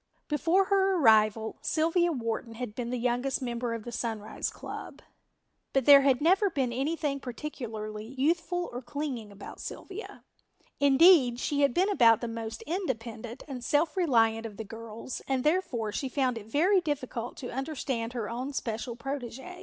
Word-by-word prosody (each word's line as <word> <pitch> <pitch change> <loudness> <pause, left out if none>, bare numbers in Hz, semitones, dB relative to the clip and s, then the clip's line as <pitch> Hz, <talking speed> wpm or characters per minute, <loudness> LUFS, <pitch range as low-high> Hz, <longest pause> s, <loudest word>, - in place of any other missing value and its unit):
Before 330 +6 +2
her 390 -1 +3
arrival 220 -3 +4
Sylvia 335 +2 +2
Wharton 230 -3 -3
had 245 -2 -5
been 235 +1 -4
the 250 - -2
youngest 245 +2 0
member 240 -2 -2
of 225 - -6
the 240 - -7
Sunrise 225 -3 -3
club, - - -8 0.7
but 270 -3 +2
there 280 -1 +9
had 270 -1 +3
never 385 +6 +4
been 265 -7 -1
anything 280 +2 -1
particularly 225 -5 -6
youthful 340 +5 0
or 245 - -4
clinging 245 -4 -5
about 200 - -10
Sylvia; 395 +3 -8 0.6
indeed, 280 -3 +6
she 285 +2 0
had 280 - +4
been 380 +3 +3
about 230 - +6
the 240 - -4
most 225 -1 -5
independent 240 - -4
and 255 -4 -6
self 300 +5 +1
reliant 230 - +2
of 210 -2 -12
the 220 - -4
girls 225 +3 -7
and 265 -2 0
therefore 300 - 0
she 265 +5 -3
found 255 -2 0
it 220 -2 -8
very 360 - +3
difficult 255 -6 -4
to 250 - -6
understand 265 -4 -3
her 230 -4 -3
own 250 +5 -4
special 230 -1 -3
protégé. 270 +6 -6
255 Hz, 160 wpm, -29 LUFS, 230-300 Hz, 0.7 s, there